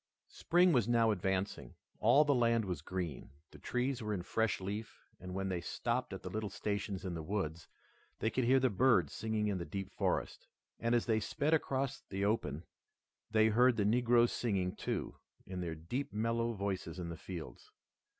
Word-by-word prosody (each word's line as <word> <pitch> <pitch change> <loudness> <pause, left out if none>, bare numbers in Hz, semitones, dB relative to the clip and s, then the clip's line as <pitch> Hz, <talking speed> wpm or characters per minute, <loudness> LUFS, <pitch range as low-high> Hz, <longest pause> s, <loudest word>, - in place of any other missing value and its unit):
Spring 175 +1 +3
was 120 -5 +3
now 115 -2 +4
advancing. 95 0 -2 0.2
All 150 +2 +6
the 145 - +4
land 115 -3 +3
was 90 -6 -3
green. 85 -5 -4 0.2
The - - -13
trees 125 +1 -1
were 105 -1 -1
in 90 - -4
fresh 110 +3 0
leaf, 105 +4 -6
and 90 0 -7
when 95 0 -1
they 90 -2 -2
stopped 120 +7 -2
at 95 - -6
the 90 - -4
little 110 0 -2
stations 100 -1 -3
in 90 - -2
the 80 - -4
woods, 85 -2 -3 0.5
they 110 - 0
could 130 +4 0
hear 130 +2 +5
the 130 -2 +2
birds 100 - +3
singing 110 -1 -1
in 100 -3 -1
the - - -3
deep 95 +2 -5
forest. - - -2 0.3
And 115 +1 +2
as 120 - +2
they 110 -2 +2
sped 145 +8 0
across 135 -4 0
the 100 +1 -3
open 80 -8 0 0.7
they 110 0 +4
heard 120 +2 +4
the 105 - +2
negroes 120 +2 +4
singing, 95 -6 -1
too, - - -3 0.3
in 90 -1 -5
their 85 -2 -3
deep 125 - -4
mellow 115 +2 0
voices 95 -4 -3
in 85 -2 -4
the 85 - -5
fields. 85 -3 -8
105 Hz, 190 wpm, -34 LUFS, 95-120 Hz, 0.7 s, All